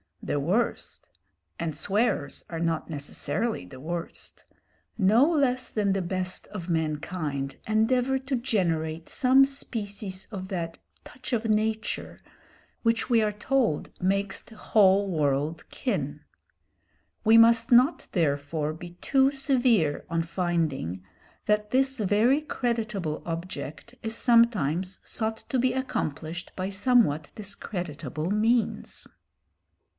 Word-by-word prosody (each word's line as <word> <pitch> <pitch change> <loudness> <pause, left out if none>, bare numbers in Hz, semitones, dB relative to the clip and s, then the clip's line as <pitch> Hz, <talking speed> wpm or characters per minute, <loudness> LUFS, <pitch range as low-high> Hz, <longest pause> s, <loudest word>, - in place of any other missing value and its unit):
The 145 - -1
worst 190 +12 -1 0.5
and 160 -3 -2
swearers 195 - 0
are 165 - -4
not 165 -1 -1
necessarily 165 - -2
the 130 +8 -12
worst 170 +4 -6 0.5
no 225 - +5
less 260 -6 +1
than 205 -3 +1
the 195 - 0
best 185 +1 -3
of 185 -4 -7
mankind 155 -3 -2
endeavour 250 +4 +2
to 265 +1 -2
generate 165 -10 -1
some 265 +1 +5
species 205 -8 -4
of 190 -3 -5
that 170 -4 -4 0.2
"touch 260 0 -8
of 230 -1 0
nature" 220 0 -1 0.6
which 230 +1 +1
we 230 -2 +5
are 215 -1 +1
told 220 - 0
makes 195 +2 0
the 225 - -16
whole 200 -2 +4
world 150 -1 -1
kin. - - -3 1.0
We 225 +1 +6
must 230 +2 +6
not 250 +7 +5
therefore 150 -2 0
be 175 +2 -9
too 270 0 +3
severe 250 - +2
on 165 0 0
finding 165 - -1 0.4
that 210 0 +1
this 265 0 +2
very 220 +8 +3
creditable 220 - -2
object 165 - -6
is 225 -1 -3
sometimes 195 - +3
sought 220 -1 -2
to 260 - +1
be 255 +1 +2
accomplished 170 - -3
by 185 +1 -2
somewhat 200 - +2
discreditable 175 - -5
means. 225 +3 0
200 Hz, 120 wpm, -27 LUFS, 165-235 Hz, 1.0 s, We